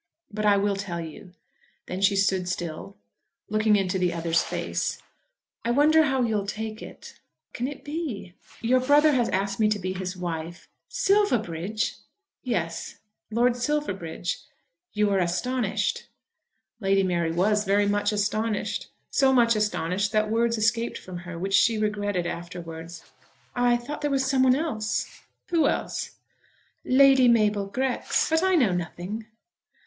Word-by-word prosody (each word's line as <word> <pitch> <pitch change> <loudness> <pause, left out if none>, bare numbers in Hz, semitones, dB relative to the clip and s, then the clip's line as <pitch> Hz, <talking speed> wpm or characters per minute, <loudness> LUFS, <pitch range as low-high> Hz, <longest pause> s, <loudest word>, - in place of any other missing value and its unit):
But 215 0 -1
I 200 -1 +5
will 200 0 +1
tell 195 -3 -4
you." 165 +3 -9 0.5
Then 185 +1 -5
she 200 0 +4
stood 190 -2 +1
still, 155 - -5 0.5
looking 215 0 +3
into 190 -1 0
the 180 -1 +1
other's 165 0 +1
face. - - -2 0.7
"I 235 - -2
wonder 305 +5 +5
how 265 -3 +1
you 225 -3 +1
will 200 -1 -3
take 220 +1 -5
it." - - -11 0.3
"What - - -51
can 245 - -2
it 285 0 -8
be?" 290 - -5 0.3
"Your 250 +3 +3
brother 290 +4 +5
has 245 -4 +1
asked 195 +1 -1
me 215 -1 +4
to 210 - +1
be 185 -1 -3
his 185 0 -5
wife." 170 -1 -5 0.2
"Silverbridge!" 220 - 0 0.4
"Yes; 170 -10 -3 0.3
Lord 240 +2 +2
Silverbridge. 220 - -2 0.5
You 210 -1 +1
are 195 - +2
astonished." 210 +6 -1 0.7
Lady 195 -2 +2
Mary 170 -3 0
was 210 +5 +2
very 200 0 +2
much 205 0 +1
astonished, 215 +1 -1 0.2
so 270 -1 +4
much 235 -3 +4
astonished 200 -2 0
that 215 0 +1
words 230 +1 +1
escaped 220 +2 0
from 185 -1 -8
her, 170 - -6
which 195 +3 -3
she 225 +3 +4
regretted 205 -4 -1
afterwards. 170 -1 -7 0.5
"I 245 -1 +3
thought 290 +6 -7
there 295 - 0
was 270 -1 +1
someone 260 -1 +4
else." 245 -8 -2 0.3
"Who 330 -5 +3
else?" - - -3 0.7
"Lady 270 -1 +6
Mabel 210 -4 +3
Grex. 255 +7 0
But 320 0 +3
I 375 0 +3
know 250 - +4
nothing." 180 +5 -5
210 Hz, 150 wpm, -26 LUFS, 185-245 Hz, 0.7 s, Lady